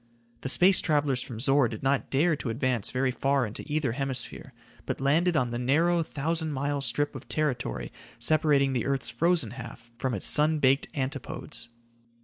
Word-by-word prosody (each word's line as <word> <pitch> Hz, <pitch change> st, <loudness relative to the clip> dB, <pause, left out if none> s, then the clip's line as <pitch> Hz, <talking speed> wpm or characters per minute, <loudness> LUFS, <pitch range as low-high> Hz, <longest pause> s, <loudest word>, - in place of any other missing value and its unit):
The 130 Hz, -, -2 dB
space 185 Hz, +6 st, +6 dB
travelers 145 Hz, -4 st, +1 dB
from 115 Hz, -3 st, -7 dB
Zor 135 Hz, +1 st, +4 dB
did 110 Hz, +1 st, -8 dB
not 135 Hz, +1 st, 0 dB
dare 155 Hz, +4 st, +2 dB
to 130 Hz, -, -5 dB
advance 125 Hz, -2 st, -1 dB
very 130 Hz, 0 st, 0 dB
far 135 Hz, 0 st, +1 dB
into 105 Hz, -, -6 dB
either 150 Hz, -4 st, 0 dB
hemisphere, 130 Hz, -1 st, -4 dB, 0.4 s
but -, -, -3 dB
landed 160 Hz, +5 st, +2 dB
on 125 Hz, -3 st, 0 dB
the 120 Hz, -, -3 dB
narrow, 165 Hz, +7 st, +2 dB
thousand 160 Hz, +1 st, -3 dB
mile 140 Hz, +1 st, -2 dB
strip 145 Hz, +1 st, 0 dB
of -, -, -9 dB
territory 125 Hz, -, -2 dB, 0.2 s
separating 140 Hz, +1 st, +2 dB
the 120 Hz, -4 st, -1 dB
earth's 135 Hz, -3 st, -1 dB
frozen 160 Hz, -1 st, +1 dB
half 120 Hz, -1 st, -10 dB
from 130 Hz, -3 st, -1 dB
its 100 Hz, -, -4 dB
sun 155 Hz, +1 st, +4 dB
baked 135 Hz, -1 st, +2 dB
antipodes. 130 Hz, -3 st, -5 dB
135 Hz, 170 wpm, -27 LUFS, 125-150 Hz, 0.4 s, space